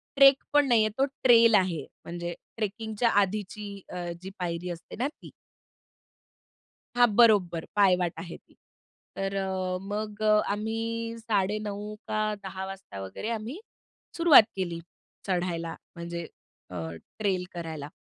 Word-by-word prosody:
ट्रेकपण 275 +1 +6
नाही 235 -3 +5
आहे, - - +1
तो 270 - +4 0.2
ट्रेल 230 -3 +7
आहे. 180 -5 +1 0.2
म्हणजे 175 0 -4 0.2
ट्रेकिंगच्या 220 +2 -1
आधीची 205 +1 -3 0.2
अ, 175 -1 -4
जी 190 - -7
पायरी 175 0 -3
असते 170 -1 -7
ना 250 +5 0
ती. 295 - -12 1.7
हां, 245 0 +6
बरोबर. 200 -8 +4
पायवाट 180 -4 +4
आहे 170 0 -7
ती. - - -28 0.6
तर 195 0 -2
अ, 190 -1 -1
मग 210 +1 -4 0.3
आम्ही 230 +2 -3
9:30 210 -1 -1
का 215 - -1 0.2
10:00 190 -1 -6
वाजता 195 - -8
वगैरे 95 - -5
आम्ही 230 - -4 0.6
सुरुवात 335 -9 +9
केली, 175 -3 -3 0.5
चढायला. 175 -3 -1 0.2
म्हणजे 170 0 -5 0.5
अ, - - -7 0.4
ट्रेल 190 -4 +1
करायला. 160 -4 -5
200 Hz, 125 wpm, -28 LUFS, 180-225 Hz, 1.7 s, सुरुवात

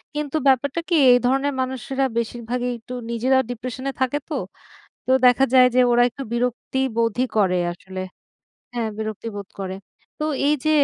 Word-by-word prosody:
কিন্তু 300 -1 -3
ব্যাপারটা 270 +4 +2
কি 345 - +3 0.2
এই 245 - +7
ধরনের 270 +3 +1
মানুষেরা 265 +1 -2
বেশিরভাগই 240 +1 -2
একটু 235 +2 -10 0.2
নিজেরাও 260 +3 +2
ডিপ্রেশন 255 +2 -6
এ - - -1
থাকে 260 +2 +1
তো। - - -3 0.7
তো 260 - +2
দেখা 250 +2 +5
যায় 255 -1 +8
যে 255 - +5
ওরা 240 0 +5
একটু 260 +3 -8
বিরক্তিবোধই 245 0 0
করে 190 -3 +3 0.2
আসলে। 190 +2 -8 0.7
হ্যাঁ 235 -2 -1
বিরক্তি 220 +1 -5
বোধ 200 -1 -6
করে। 190 -1 -4 0.4
তো - - -2 0.2
এই 295 - +4
যে - - +3
250 Hz, 160 wpm, -22 LUFS, 230-265 Hz, 0.7 s, যায়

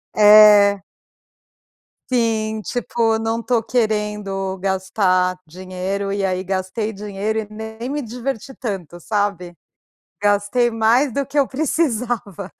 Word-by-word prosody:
É. 210 -2 +7 1.3
Sim, 220 -3 0
tipo, 230 -1 -1
não 225 +1 -2
estou 230 -1 0
querendo 210 -5 -2
gastar 190 -1 0
dinheiro, 185 +3 -4
e 200 0 -1
aí 185 -1 -1
gastei 190 +3 -3
dinheiro 210 +1 -3
e 215 - -5
nem 220 +3 -7
me 290 +1 -2
diverti 250 +2 -5
tanto, 185 - -6
sabe 200 -3 -2 0.7
gastei 205 +4 +2
mais 230 +4 +2
do 280 - 0
que 290 +1 -3
eu 275 - +3
precisava. 245 - -2
210 Hz, 115 wpm, -20 LUFS, 195-230 Hz, 1.3 s, É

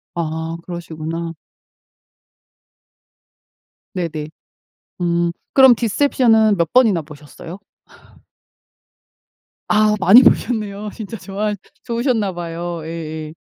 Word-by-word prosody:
아 160 0 -3
그러시구나. 165 -1 -6 2.6
네네. 160 -4 -4 0.7
음. 170 0 +1 0.2
그럼 265 -2 +8
디셉션은 225 -2 +2
몇 170 -2 0
번이나 225 -9 +4
보셨어요? 150 +4 -11 2.1
아 215 0 +3
많이 205 +7 +7
보셨네요. 210 -3 0
진짜 225 0 -7
좋아하 210 +2 -3 0.3
좋으셨나 235 -4 -1
봐요. 170 0 -5
예예. 160 -1 -6
175 Hz, 190 characters per minute, -19 LUFS, 165-215 Hz, 2.6 s, 그럼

